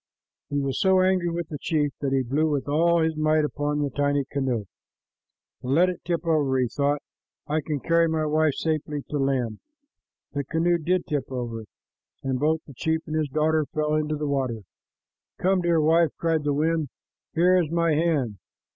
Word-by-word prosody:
He 145 - -1
was 140 -1 -2
so 190 -1 +4
angry 185 -2 +2
with 170 -1 -4
the 150 -4 -6
chief 150 -3 0
that 140 -2 -1
he 135 -1 +2
blew 145 +6 +1
with 145 -2 -1
all 165 +3 +3
his 160 0 0
might 155 0 +2
upon 150 0 -1
the 140 - -2
tiny 145 0 +1
canoe. 130 -6 -2 1.0
"Let 155 +9 +3
it 180 - -5
tip 170 -1 -2
over," 145 -5 +2
he 125 -1 +2
thought. 145 +2 0 0.4
"I 155 +1 0
can 150 0 -3
carry 165 +3 +3
my 160 -1 0
wife 155 -1 +2
safely 150 -2 -2
to 150 - -1
land." 130 -6 0 0.7
The 140 -1 -1
canoe 170 +4 +1
did 180 +3 0
tip 145 -3 -3
over, 115 -3 -4 0.6
and 130 -1 -1
both 155 +2 +1
the 140 - -12
chief 160 +5 -1
and 155 - -4
his 155 -2 0
daughter 155 +1 +1
fell 150 0 0
into 155 0 0
the 150 0 -3
water. 130 -5 -1 0.8
"Come, 190 0 +2
dear 170 -2 +2
wife," 165 +1 +4
cried 160 -2 0
the 145 - +2
wind. 160 -1 0 0.5
"Here 180 +2 +4
is 160 - -3
my 170 -1 +2
hand." 150 - 0
155 Hz, 185 wpm, -25 LUFS, 140-165 Hz, 1.0 s, so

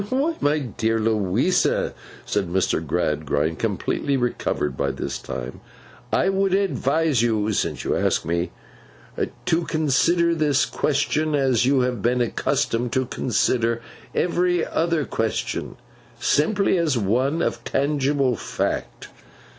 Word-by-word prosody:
'Why, 280 +6 +1
my 145 +1 +3
dear 115 -4 -1
Louisa,' 110 - +1 0.3
said 100 -3 -1
Mr. 90 -2 0
Gradgrind, 75 -1 -1
completely 140 -1 -1
recovered 120 - -1
by 70 - 0
this 70 -1 -4
time, 65 +1 -6 0.5
'I 190 - +2
would 195 0 +1
advise 160 - +1
you 110 -2 +1
(since - - -1
you - - 0
ask - - +1
me) 85 +1 -1 1.0
to 165 +1 +1
consider 170 +3 +2
this 150 -3 +2
question, 150 +1 0
as 130 -4 +2
you 135 -1 +3
have 125 -4 -1
been 125 +4 +1
accustomed 120 0 0
to 130 0 +1
consider 115 -1 0 0.4
every 175 -1 +1
other 165 -3 0
question, 115 -1 -2 0.4
simply 195 +4 +2
as 155 -6 +1
one 130 - +1
of - - -2
tangible 140 -2 +1
Fact. - - -3
130 Hz, 125 wpm, -23 LUFS, 110-155 Hz, 1.0 s, my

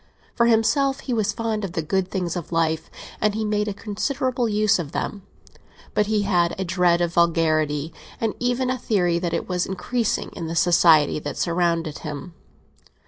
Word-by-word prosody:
For 235 - +3
himself, 235 +5 +2
he 255 - -3
was 215 -3 +1
fond 220 -1 -2
of 185 -3 -4
the 160 - -2
good 185 +4 -1
things 180 -3 -2
of 175 -2 -6
life, 160 -1 0 0.3
and 210 -1 +2
he 220 0 -1
made 210 0 0
a 205 - -2
considerable 245 +3 -1
use 210 -1 +2
of 150 -4 -5
them; 205 - -3 0.7
but 210 -1 +2
he 215 -1 +1
had 175 -3 +1
a 190 - -1
dread 175 -1 +2
of 170 -1 0
vulgarity, 155 -3 +1 0.3
and 225 -2 0
even 245 +1 0
a 255 - -2
theory 180 -7 +1
that 170 -1 -2
it 165 - -2
was 180 -1 -1
increasing 215 +5 -2
in 170 -4 -5
the 165 - -4
society 165 -4 +4
that 145 -1 -6
surrounded 170 -2 0
him. 150 +3 -7
185 Hz, 185 wpm, -23 LUFS, 170-220 Hz, 0.7 s, society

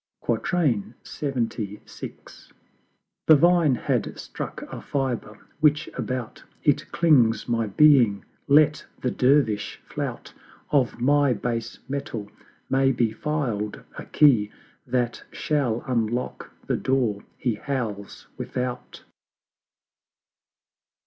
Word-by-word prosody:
LXXVI. 120 - -1 1.5
The 155 - +9
Vine 170 -2 +4
had - - -1
struck - - -6
a - - -8
fiber: 125 -6 -3 0.2
which 150 0 +3
about 125 -3 -4 0.2
It - - +1
clings 125 -10 +3
my 115 -2 0
Being 120 -3 +5 0.2
let 150 +1 +5 0.2
the 125 - -1
Dervish 125 -6 +2
flout; - - -5 0.4
Of 135 -5 +2
my 140 +1 +3
Base 115 +1 -3
metal 115 -7 -5 0.4
may 135 0 +3
be 120 -3 +1
filed 120 -8 -2
a - - -7
Key 120 -9 +4 0.4
That 120 -2 -1
shall 135 -7 -1
unlock 120 -1 -2 0.2
the - - 0
Door 120 -6 0
he 120 -3 0
howls 110 -4 -4
without. 125 -1 -4
125 Hz, 95 wpm, -25 LUFS, 115-145 Hz, 1.5 s, The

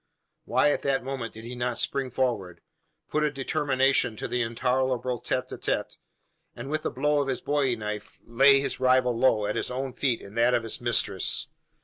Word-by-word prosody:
Why 145 - +3
at - - -1
that 135 -2 0
moment 130 -4 -5
did 110 - -9
he 120 +2 -7
not 120 -1 -2
spring 135 -2 0
forward 115 -9 -2 0.5
put 155 - 0
a 140 -2 -1
termination 135 -5 +2
to - - -4
the 125 - -1
intolerable 125 +1 0
tete - - -2
a - - -7
tete - - -2 0.6
and 130 +4 -7
with 155 0 -1
a - - 0
blow 145 +3 +1
of 140 - -2
his 130 - -1
bowie 140 -4 +1
knife 105 -1 -6
lay 135 +4 +5
his 135 -1 -2
rival 130 -1 +3
low 115 -3 +3
at - - -2
his - - 0
own 130 +1 -4
feet 125 -2 0
and 100 +2 -12
that 120 +1 +4
of 115 - 0
his 115 - -3
mistress? 105 -6 0
125 Hz, 200 wpm, -27 LUFS, 115-135 Hz, 0.6 s, lay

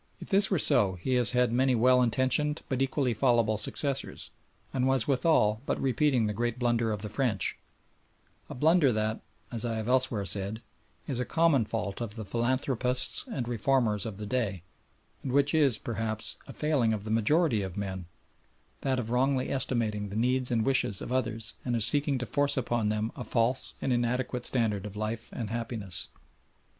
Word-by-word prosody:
If - - -9
this 195 0 +3
were 190 - +1
so 105 -9 +3
he 90 +9 -3
has 125 -1 +5
had 125 -1 +2
many 130 +1 +2
well 125 +2 +4
intentioned 130 +5 +2
but 130 -1 -1
equally 135 -2 0
fallible 115 -2 +2
successors, 135 +5 0 0.4
and 130 -1 0
was 130 -3 +2
withal 125 -6 +2
but - - -1
repeating 130 -2 +1
the 105 - -2
great 120 +2 -2
blunder 120 -2 0
of 105 -1 -4
the - - -3
French 105 -2 -1 0.9
a - - -7
blunder 155 +1 +3
that, 110 0 -2 0.3
as 115 -3 +2
I 115 -2 -2
have 110 0 -4
elsewhere 125 -5 +2
said, 100 +4 -1 0.4
is 135 -5 -2
a - - 0
common 160 -6 +2
fault 105 -1 -4
of 110 -2 -5
the 110 -2 -6
philanthropists 125 +3 +2
and 125 - -3
reformers 115 -3 0
of 105 -3 -7
the 105 - -6
day, 105 -6 -2 0.6
and 130 - -4
which 140 +2 +2
is, 140 -8 +4
perhaps, 110 -1 -4
a - - -8
failing 140 -8 +1
of 105 -2 -4
the 110 - -5
majority 115 +2 +2
of 95 -1 -6
men, 95 -3 -5 0.7
that 135 -1 0
of 115 -2 -4
wrongly 130 +1 +1
estimating 115 -6 -1
the 100 - -7
needs 125 +3 0
and 115 -3 0
wishes 130 -7 +1
of - - -7
others 115 -3 -2
and 120 -2 -1
of 115 - +2
seeking 140 +3 +2
to 125 - -4
force 145 +1 +1
upon 120 -4 0
them 110 +1 -2
a 125 - -6
false 120 +3 0
and 130 - +1
inadequate 120 +1 -1
standard 105 -5 0
of 105 - -10
life 110 +2 -3
and 110 -4 -5
happiness. 115 -6 -4
120 Hz, 185 wpm, -28 LUFS, 110-130 Hz, 0.9 s, has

